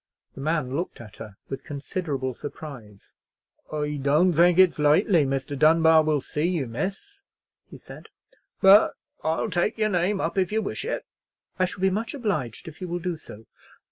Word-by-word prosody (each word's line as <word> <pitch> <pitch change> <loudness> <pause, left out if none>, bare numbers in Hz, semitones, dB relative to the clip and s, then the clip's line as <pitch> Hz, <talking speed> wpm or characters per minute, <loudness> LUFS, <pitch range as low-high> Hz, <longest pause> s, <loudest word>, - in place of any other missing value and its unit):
The - - -9
man 150 -3 -1
looked 175 +4 -4
at 110 -3 -12
her 105 -3 -10
with 135 - -6
considerable 140 -2 -4
surprise. 125 -8 -10 0.6
"I 150 -1 -2
don't 150 +6 +3
think 175 +2 +4
it's 185 -4 +5
likely 155 +2 +4
Mr. 135 +1 -3
Dunbar 160 +2 +5
will 155 -2 0
see 150 +4 -3
you, 170 -6 -1
miss," 195 - -5 0.5
he - - -11
said; - - -13 0.5
"but 195 +2 +7 0.3
I'll 160 +7 -1
take 180 +6 0
your 215 -1 +1
name 190 +1 0
up 170 +3 -1
if 185 0 0
you 220 +1 0
wish 200 - -4
it." 485 - -3 0.5
"I 185 - +4
shall 185 - -7
be 190 0 +3
much 230 +7 -3
obliged 200 - -3
if 165 +3 -11
you 185 - -4
will 175 0 -3
do 175 0 -3
so." 110 -8 -13
160 Hz, 175 wpm, -25 LUFS, 140-185 Hz, 0.6 s, but